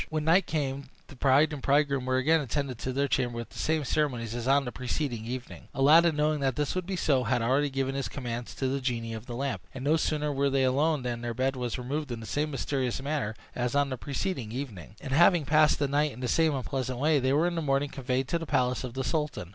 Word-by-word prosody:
When 155 -1 -2
night 170 +5 +4
came 140 -3 -2 0.2
the 145 - -11
bride 140 +4 +3
and 145 - -6
bridegroom 140 -2 +2
were 130 0 +2
again 155 +5 +3
attended 135 -2 -3
to 130 - -3
their 140 +2 0
chamber 125 -3 0
with 115 - -5
the - - -9
same 155 -1 +1
ceremonies 125 -6 -1
as 120 0 -4
on 140 +1 +4
the 125 - -4
preceding 125 -3 -3
evening. 125 +1 -7
Aladdin, 160 +4 +5
knowing 150 0 +1
that 135 -3 0
this 150 -1 -1
would 185 -1 -3
be 195 - -2
so, 140 -7 +1
had 120 +1 +1
already 135 +5 +2
given 135 0 -1
his 135 0 -3
commands 120 -3 -5
to 135 - -1
the 135 +1 -1
genie 115 -3 -2
of 110 +1 -8
the 120 - -5
lamp; 135 +2 -2
and 130 - -6
no 150 +3 +3
sooner 150 -2 -1
were 140 0 +1
they 135 -1 +2
alone 140 +2 +2
than 120 -1 -3
their 120 -1 -4
bed 135 +2 0
was 125 -3 -3
removed 140 +3 -3
in 120 - -4
the 115 - -8
same 150 +6 -1
mysterious 135 -3 -2
manner 135 -6 -2 0.2
as 125 +1 -1
on 145 -1 +2
the - - -1
preceding 140 - -3
evening; 115 -7 -6
and 135 -2 -5
having 170 +1 +5
passed 155 +1 +4
the 145 - 0
night 145 +2 +1
in 120 - -11
the 125 - -2
same 160 +3 +2
unpleasant 130 -1 -3
way, 150 +3 +3
they 130 0 +1
were 150 +4 +3
in 175 - 0
the 165 - -2
morning 140 -1 +1
conveyed 130 0 -2
to 170 - 0
the 165 - -6
palace 125 -1 +1
of 125 -1 -6
the 135 - -2
sultan. 150 - -2
135 Hz, 255 wpm, -28 LUFS, 125-150 Hz, 0.2 s, Aladdin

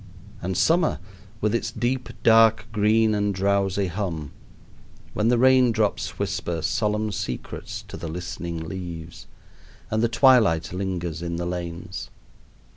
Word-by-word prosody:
And 90 0 -2
summer, 165 0 +3 0.4
with 105 +1 +1
its 115 -1 0
deep 125 +2 -2
dark 115 -1 +5
green 110 +1 +3
and 105 -1 0
drowsy 100 0 +1
hum 85 -5 -4 0.8
when 105 - +1
the 120 +1 +4
rain 130 0 +5
drops 110 -2 -1
whisper 85 -2 -2
solemn 105 0 0
secrets 65 -9 -5
to - - -8
the - - -6
listening 85 0 -5
leaves 85 -2 -7 0.6
and 110 0 +1
the 115 - +2
twilight 110 - +4
lingers 90 -4 -3
in 85 -1 -3
the 85 +1 -3
lanes! 85 0 -5
100 Hz, 130 wpm, -24 LUFS, 85-110 Hz, 0.8 s, dark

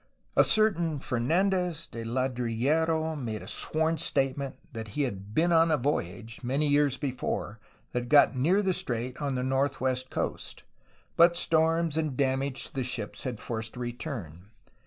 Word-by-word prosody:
A - - +7
certain 175 -8 +2
Fernandez 165 +6 0
de 115 - -7
Ladrillero 130 +7 0
made 115 -7 -4
a - - -10
sworn 160 0 0
statement 135 -3 0 0.2
that 110 -1 -5
he 145 - +2
had 100 -4 -5
been 170 +2 +3
on 165 0 +5
a 155 - +3
voyage, 115 - -2
many 135 +5 +1
years 145 -2 +3
before, 125 -5 -3 0.3
that 120 0 -3
got 145 -2 +6
near 175 +11 +3
the 190 -1 +2
strait 125 -2 -3
on 140 -2 -1
the 125 - -1
northwest 130 -1 0
coast, - - -4 0.5
but 170 +1 +6
storms 165 -1 +2
and 155 -5 -1
damage 135 0 0
to - - -13
the 135 - -1
ships 115 -5 -5
had 125 -4 -3
forced 110 -1 -4
a - - -7
return. 120 - -6
135 Hz, 155 wpm, -28 LUFS, 120-160 Hz, 0.5 s, A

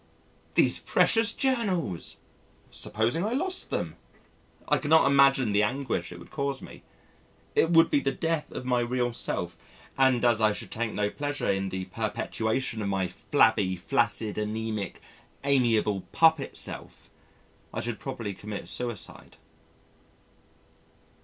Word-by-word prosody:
These - - +5
precious 225 -1 +3
Journals! 195 - -1 0.5
Supposing 115 - 0
I 215 +3 -1
lost 365 +7 0
them! - - -3 0.7
I - - +3
cannot 160 +2 +5
imagine 135 -4 +5
the 100 +1 +3
anguish 125 +4 -1
it - - -8
would - - -13
cause 140 -1 -2
me. - - -11 0.7
It 165 - +3
would 165 -1 +5
be 145 - +4
the 135 - 0
death 165 0 -2
of 125 - -6
my 125 -1 +2
real 120 0 0
self 90 -7 -4 0.4
and 130 -2 +4
as 115 -2 +3
I 110 -1 +4
should - - -6
take 115 0 -2
no 105 0 -1
pleasure 145 -6 -2
in 95 0 -1
the 95 0 -4
perpetuation 110 +3 -2
of 100 - -2
my 95 -2 0
flabby, 105 -2 +2
flaccid, 105 +3 0
anæmic, 110 -1 -3 0.5
amiable 115 -7 +2
puppet 160 -4 +3
self, - - -6 0.6
I - - -4
should 120 -3 -3
probably 115 -7 -5
commit 105 +2 -7
suicide. 120 -5 -4
120 Hz, 135 wpm, -28 LUFS, 105-140 Hz, 0.7 s, These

